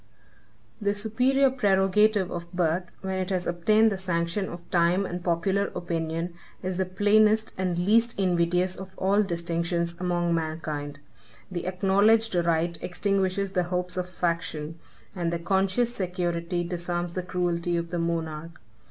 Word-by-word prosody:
The 205 0 +1
superior 250 +6 +2
prerogative 205 -3 +3
of 170 -1 -6
birth, 175 0 0
when 190 -1 -2
it 185 0 -2
has 185 -2 -1
obtained 215 +6 +3
the 195 - -3
sanction 180 +1 -1
of 170 0 -9
time 175 +2 +3
and 175 -1 -5
popular 190 +4 +1
opinion, 165 0 -3 0.3
is 185 -1 -2
the 190 -1 0
plainest 215 +3 +3
and 185 -2 -1
least 225 +5 +3
invidious 180 0 +2
of 190 0 -10
all 195 +2 +3
distinctions 170 -2 -1
among 175 -1 0
mankind. 155 -3 -3 0.5
The 175 -1 -4
acknowledged 200 +4 +3
right 170 -1 +1
extinguishes 195 +1 0
the 180 -2 +1
hopes 180 0 -1
of 180 0 -2
faction, 165 -3 -2 0.4
and 170 -2 -1
the 170 - 0
conscious 195 +7 +1
security 175 -2 -2
disarms 175 0 -3
the 185 - -2
cruelty 175 -1 -1
of 170 0 -4
the 175 - -1
monarch. 165 -1 -3
180 Hz, 145 wpm, -26 LUFS, 170-195 Hz, 0.5 s, prerogative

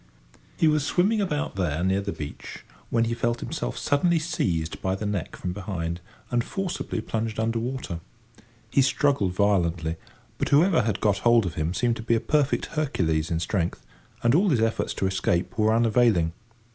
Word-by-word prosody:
He 160 - +4
was 155 -2 +3
swimming 195 +9 +2
about 150 -7 -1
there 85 -3 0
near 95 +1 +2
the 100 0 -3
beach, 75 -5 -8 0.2
when 115 0 +2
he 115 0 -1
felt 120 0 -1
himself - - -4
suddenly 165 +4 +2
seized 95 - -1
by 95 0 0
the 105 - -5
neck 105 -5 -3
from 90 -1 -4
behind, 90 -4 -4 0.3
and 120 -1 +2
forcibly 185 - -3
plunged 110 0 -3
under 115 +1 0
water. 120 -8 -4 0.7
He 140 - +4
struggled 135 -8 +2
violently, 85 -5 +1 0.4
but - - 0
whoever 165 +3 +5
had 110 -2 -1
got 100 -2 +2
hold 120 0 +4
of 85 - -3
him 80 +4 -2
seemed 120 -1 +1
to - - -6
be 115 +1 +2
a - - +2
perfect 145 +4 +1
Hercules 85 - 0
in 80 - 0
strength, 85 0 -2 0.4
and 120 0 +4
all 190 +6 +4
his 135 -8 +2
efforts 115 0 0
to - - -1
escape 95 +2 0
were 110 -1 +3
unavailing. 115 -7 +3
110 Hz, 180 wpm, -25 LUFS, 90-135 Hz, 0.7 s, whoever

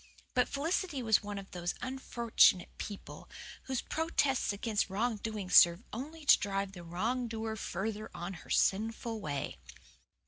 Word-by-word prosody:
But - - +3
Felicity 310 -1 -1
was 220 -2 +4
one 205 -1 -5
of 195 -1 -8
those 175 -2 -3
unfortunate 240 -7 +2
people 205 -2 -8 0.4
whose 260 -2 -2
protests 295 -7 +1
against 205 0 -1
wrong 220 +4 0
doing 210 -2 -4
serve 175 +2 +7
only 300 +7 -6
to - - +7
drive 195 -1 -2
the 180 -3 -10
wrong 225 +9 -1
doer 225 -1 -3
further 215 +2 -4
on 175 +3 -5
her - - -16
sinful 225 +2 +1
way. 145 -6 -4
220 Hz, 145 wpm, -32 LUFS, 195-245 Hz, 0.4 s, serve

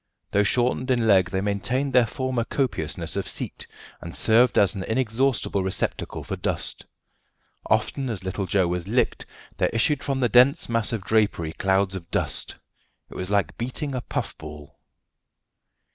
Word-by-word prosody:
Though 100 - +3
shortened 125 +4 +1
in 120 -3 +2
leg, 95 -4 +4
they 95 +1 -1
maintained 105 +7 -1
their 125 -2 +5
former 130 -2 -2
copiousness 120 - -2
of - - -2
seat, - - -3 0.3
and 85 - -7
served 115 +2 +4
as 100 - +5
an 95 - -4
inexhaustible 115 -3 0
receptacle 95 0 -2
for - - -4
dust. - - -4 0.8
Often 135 -2 0
as 100 -5 -4
little 95 +1 -3
Joe 95 -2 +2
was 90 0 -3
"licked" 120 +5 0 0.3
there - - +2
issued 140 +6 +1
from 135 -2 -2
the 125 - +3
dense 125 +7 +5
mass 115 -2 +2
of 110 -4 -3
drapery 100 -7 +1
clouds 95 +2 +1
of 85 -3 -7
dust. - - -1 0.6
It - - -11
was 90 0 -4
like 100 -1 0
beating 130 +4 -3
a 130 - -2
puff - - -4
ball. 75 -2 -11
110 Hz, 160 wpm, -24 LUFS, 95-125 Hz, 0.8 s, their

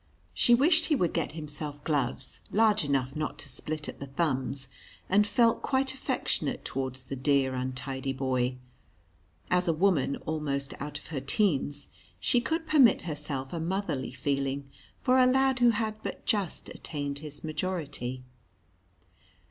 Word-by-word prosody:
She 240 - +5
wished 315 +5 +4
he 310 - +2
would 175 - +1
get 165 -3 -1
himself 150 -2 -5
gloves 135 -3 -1
large 215 -2 +4
enough 135 -2 0
not 150 -1 -3
to 145 - -8
split 150 +3 -4
at - - -7
the 140 - -6
thumbs, 135 -2 -1 0.4
and 205 +2 +4
felt 230 +1 +3
quite 265 0 +1
affectionate 265 - -1
towards 130 -1 -3
the 135 - -5
dear, 135 0 +2
untidy 130 +1 -3
boy. 130 -1 0 0.9
As 180 0 +3
a 165 - +4
woman 160 -5 +2
almost 145 -3 -2
out 145 +1 -4
of - - -12
her 150 -4 -2
teens, 145 -2 0 0.3
she 245 - +2
could 320 +5 -1
permit 290 -7 +5
herself 145 -4 -4
a 170 - -2
motherly 170 -6 -2
feeling 140 +1 -1 0.3
for 255 0 +3
a 255 - +6
lad 265 0 +3
who 240 -1 +6
had 215 -1 -1
but - - -6
just 200 -6 0
attained 145 -2 -4
his 150 -1 -9
majority. 150 -7 -3
150 Hz, 150 wpm, -29 LUFS, 135-205 Hz, 0.9 s, a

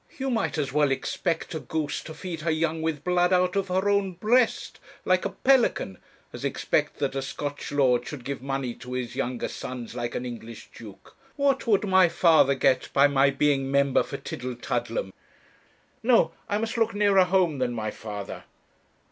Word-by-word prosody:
You 265 -1 -2
might 225 -8 -1
as 140 -3 -2
well 150 -1 +3
expect 165 +6 -2
a 160 - -3
goose 155 -2 -3
to 160 - -8
feed 175 -4 -6
her 165 - -1
young 160 0 0
with 160 -3 -2
blood 180 0 +2
out 180 0 +2
of 195 -1 0
her 190 +2 0
own 200 -2 +1
breast, 225 +7 +1 0.3
like 185 0 +2
a - - 0
pelican, 245 - +1 0.3
as - - -8
expect - - 0
that 140 -2 -1
a 135 - -2
Scotch 145 +1 -5
lord 125 -4 +2
should 135 -5 -7
give 140 -1 -4
money 135 -2 -3
to 125 +1 -9
his 125 -1 -4
younger 130 -2 -2
sons 125 -3 -7
like 120 -1 -4
an 125 - -3
English 115 -2 -9
duke. 105 -4 -13 0.2
What 275 -3 +1
would 210 -3 +3
my 190 -2 +5
father 160 -6 +4
get 130 -1 +2
by 140 - +6
my 140 -1 +3
being 135 -1 +1
member 140 -1 +3
for - - -5
Tillietudlem? 125 - -4 0.9
No; 240 +1 +4 0.2
I 205 - +1
must 225 +2 -2
look 225 -1 +1
nearer 200 -2 +4
home 180 -6 +1
than 125 -1 0
my 110 -2 -3
father. 105 -2 -7
150 Hz, 180 wpm, -26 LUFS, 130-190 Hz, 0.9 s, by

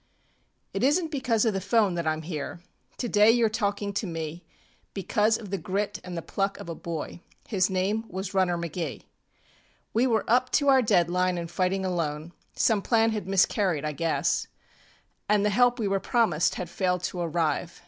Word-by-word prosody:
ŌĆ£It - - -2
isnŌĆÖt 310 +5 +2
because 250 -6 +1
of 220 - +2
the 195 - -1
ŌĆÖphone 200 0 +2
that 170 -1 -2
IŌĆÖm 155 0 -1
here. 165 +1 -5 0.3
Today 215 -3 +4
you 235 0 +4
are - - +2
talking 205 -2 -2
to 205 +1 -2
me 165 0 -5 0.5
Because 210 +3 +1
of 205 -4 -10
the 195 - -1
grit 195 +5 -2
and 180 -1 -6
the 165 - -4
pluck 195 0 -2
of - - -9
a 170 - -4
boy. 165 +1 -6 0.3
His 190 -3 +2
title 195 +4 -1
was 190 +1 -5
Runner 185 -2 +2
McGee. 170 - -4 0.9
We 240 +4 +3
were 225 -3 +1
up 250 +2 +3
to 285 -2 +3
our 265 -1 +6
dead 180 -7 +3
line 180 +1 +1
anŌĆÖ 170 -1 -4
fighting 185 +2 0
alone; 165 -2 -3 0.2
Some 215 -3 +2
plan 225 +1 +2
had 215 -3 -4
miscarried, 190 -4 +2
I 150 - -1
guess, 165 +2 0 0.8
And 210 -1 +3
the 210 - +2
help 245 +3 +4
we 220 -4 -1
were 195 0 +1
promised 215 -9 +1
had 180 - -4
failed 180 +1 -1
to 180 - -3
arrive. 165 0 -1
190 Hz, 190 wpm, -27 LUFS, 170-220 Hz, 0.9 s, our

